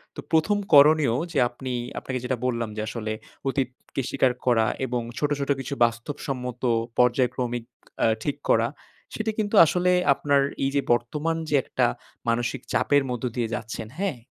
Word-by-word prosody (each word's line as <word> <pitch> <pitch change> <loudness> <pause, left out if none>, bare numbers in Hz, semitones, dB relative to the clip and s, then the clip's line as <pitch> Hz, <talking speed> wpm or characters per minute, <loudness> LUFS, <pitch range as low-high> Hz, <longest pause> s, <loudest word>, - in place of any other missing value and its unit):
তো - - -8
প্রথম 160 +6 +3 0.2
করণীয় 145 -3 +7 0.2
যে 150 - +1
আপনি 130 +1 -6 0.3
আপনাকে 130 -1 -4
যেটা 125 0 -1
বললাম 115 -3 -1
যে - - -1
আসলে 110 0 -4 0.4
অতীতকে 135 0 -3
স্বীকার 130 -2 +2
করা 115 -3 +4 0.2
এবং 125 -1 -2 0.2
ছোট, 145 - 0
ছোট 140 - -3
কিছু 135 +1 -4
বাস্তবসম্মত 125 +1 -4 0.4
পর্যায়ক্রমিক 125 -1 +1 0.4
আ - - +5 0.2
ঠিক 145 - -1
করা। 115 +1 +4 0.5
সেটা 220 0 -1
কিন্তু 210 0 0
আসলে 180 +3 +2 0.2
আপনার 140 0 +2 0.2
এই 135 - +2
যে 140 - +3
বর্তমান 150 +7 -1
যে 150 - +2
একটা - - 0 0.4
মানসিক 120 +2 -1
চাপের 145 -1 +3
মধ্য 125 -1 -4
দিয়ে 120 -3 -1
যাচ্ছেন, 115 -1 -6
হ্যাঁ? 190 -7 -1
130 Hz, 155 wpm, -25 LUFS, 120-145 Hz, 0.5 s, করণীয়